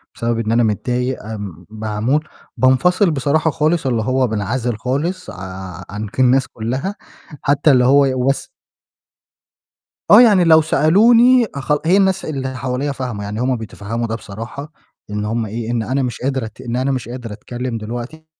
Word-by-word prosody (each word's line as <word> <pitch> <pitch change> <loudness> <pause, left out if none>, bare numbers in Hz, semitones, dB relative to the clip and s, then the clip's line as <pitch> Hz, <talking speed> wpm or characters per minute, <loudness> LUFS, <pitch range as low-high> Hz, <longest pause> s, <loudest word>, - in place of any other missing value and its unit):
بسبب 115 0 -1
إن 110 -1 -1
أنا 120 +1 +3
متضايق 125 +4 -1
آآ 100 -6 -7
معمول، 110 +7 -1 0.3
بانفصل 175 +9 +3
بصراحة 155 +3 +1
خالص 155 0 0
اللي 120 -3 +1
هو 130 +2 +1
بانعزل 110 +2 -2
خالص 150 +10 -2
ع 95 -2 -8
عن 105 +2 -5
ك 100 - -10
الناس 130 +1 +4
كلّها، 130 - -4 0.5
حتى 145 +1 +3
اللي 125 -2 +4
هو 140 +2 +5
وس 130 +2 0 1.6
آه، - - +10
يعني 205 -7 +6
لو 160 -1 +6
سألوني 230 +11 +5
أخل 145 +1 0
هي 180 +4 +4
الناس 190 -1 +2
اللي 130 -3 -4
حواليّا 130 +3 -2
فاهمة، 125 -6 -5
يعني 105 +2 -5
هم 130 +1 +1
بيتفهّموا 115 +1 -5
ده 110 - -3
بصراحة، 115 +8 -8 0.4
إن 105 0 -3
هم 115 +1 -1
إيه 115 +2 -4
إن 120 -2 0
أنا 130 +5 -1
مش 125 -3 -4
قادرة 130 -2 -1
أت 110 +3 -11
إن 120 -2 -4
أنا 130 +2 0
مش 125 -3 -3
قادر 120 -3 -6
أتكلِّم 120 +3 -5
دلوقتي، 120 +8 -7
125 Hz, 165 wpm, -18 LUFS, 110-145 Hz, 1.6 s, آه